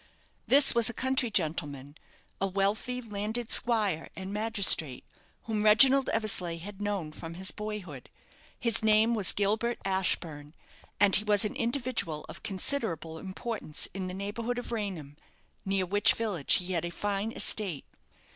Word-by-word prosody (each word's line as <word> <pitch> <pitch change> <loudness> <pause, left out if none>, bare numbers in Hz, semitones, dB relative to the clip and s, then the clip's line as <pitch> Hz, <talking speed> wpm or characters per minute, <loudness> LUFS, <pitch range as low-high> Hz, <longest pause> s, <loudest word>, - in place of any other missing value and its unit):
This 275 +1 +7
was 235 0 +4
a 240 - -6
country 260 -1 0
gentleman 150 -7 -3 0.5
a 195 - +1
wealthy 200 +6 -2
landed 220 +2 -4
squire 210 -9 +2
and 190 +1 -7
magistrate 205 - +2 0.4
whom 220 -2 -3
Reginald 260 +6 +5
Eversleigh 195 -6 0
had 200 +4 -10
known 200 -7 -3
from 165 +1 -9
his 190 +1 -1
boyhood. 205 -11 -8 0.5
His 230 -3 +2
name 220 +1 +3
was 210 -5 +5
Gilbert 215 +4 -1
Ashburne; 165 -6 -1 0.4
and 200 -1 +6
he 210 - +3
was 210 0 +2
an 210 - -4
individual 235 - -2
of - - -10
considerable 185 - -4
importance 195 -3 -4
in 190 0 -5
the 185 - -6
neighbourhood 225 +5 -4
of 245 - -6
Raynham, 185 -10 -5 0.5
near 195 -1 -1
which 205 +4 +2
village 205 -10 0
he 185 +1 -2
had 170 -2 -1
a 175 - -3
fine 205 +4 -3
estate. 190 -10 +2
205 Hz, 145 wpm, -28 LUFS, 175-225 Hz, 0.5 s, This